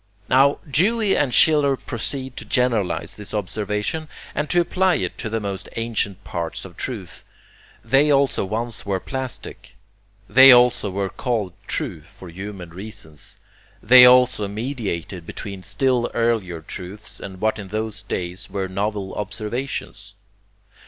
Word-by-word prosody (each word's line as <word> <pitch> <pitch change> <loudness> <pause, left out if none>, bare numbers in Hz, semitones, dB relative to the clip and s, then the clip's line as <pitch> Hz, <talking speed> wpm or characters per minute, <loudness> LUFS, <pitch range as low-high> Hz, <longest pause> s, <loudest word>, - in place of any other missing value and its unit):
Now 135 +2 +5
Dewey 200 +8 +2
and 140 -3 +2
Schiller 140 +1 +5
proceed 130 +2 -5
to - - -6
generalize 120 -8 0
this 105 +1 -6
observation 105 - -2 0.3
and 150 0 -2
to 175 - +3
apply 185 +1 +2
it - - -2
to 110 - -3
the 115 +1 -1
most 100 -2 -5
ancient 105 -4 -2
parts 85 0 -5
of 90 -3 -11
truth. 105 -9 -6 0.6
They 140 +3 +4
also 140 -5 +3
once 115 +4 -3
were 100 -1 -1
plastic. 130 +3 -7 0.5
They 130 +4 +9
also 120 -4 +5
were 95 0 -2
called 110 -8 -2
true 80 -4 -3
for 85 +3 -13
human 95 0 -8
reasons. 85 -6 -8 0.5
They 125 +3 +9
also 125 -4 +5
mediated 100 - -4
between 100 -2 -7
still 125 +5 +1
earlier 110 -8 0
truths 95 +6 -8
and 95 -2 -8
what 110 +1 0
in 100 - -7
those 110 +1 -3
days 90 +1 -5
were 95 -1 -2
novel 100 +1 -3
observations. 110 +6 -5
110 Hz, 140 wpm, -22 LUFS, 95-130 Hz, 0.6 s, They